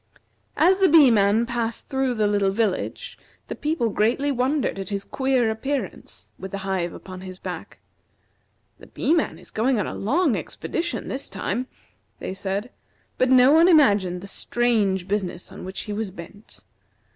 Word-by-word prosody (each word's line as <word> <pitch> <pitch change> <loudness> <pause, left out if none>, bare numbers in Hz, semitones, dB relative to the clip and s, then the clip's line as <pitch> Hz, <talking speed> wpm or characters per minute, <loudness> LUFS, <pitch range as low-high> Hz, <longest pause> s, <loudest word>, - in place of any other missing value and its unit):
As 375 +2 +4
the 385 - +5
Bee 300 -5 +7
man 210 +1 +3
passed 235 -1 -3
through 265 -2 0
the 215 -1 +1
little 205 -1 +2
village 205 -1 -2 0.3
the - - -4
people 300 -6 -1
greatly 235 +8 +1
wondered 265 -3 0
at 195 - -5
his 200 -1 -2
queer 265 -4 +1
appearance, 220 - -5
with 190 - -6
the 200 - -5
hive 185 -3 -1
upon 185 -1 -10
his 185 -1 -8
back. - - -7 1.0
"The - - -14
Bee 315 - 0
man 335 - 0
is - - -10
going 240 +2 +1
on 205 - 0
a - - -5
long 280 - +1
expedition 340 0 -4
this 270 - -4
time," 200 +6 -3 0.5
they - - -5
said; 200 +5 -3 0.5
but 255 - +3
no 255 +1 +6
one 325 +3 +6
imagined 205 - +4
the - - -8
strange 205 -4 0
business 190 -3 -3
on - - -9
which 190 +1 -5
he 210 - -5
was 215 -1 -3
bent. 185 +3 -13
220 Hz, 170 wpm, -24 LUFS, 195-265 Hz, 1.0 s, Bee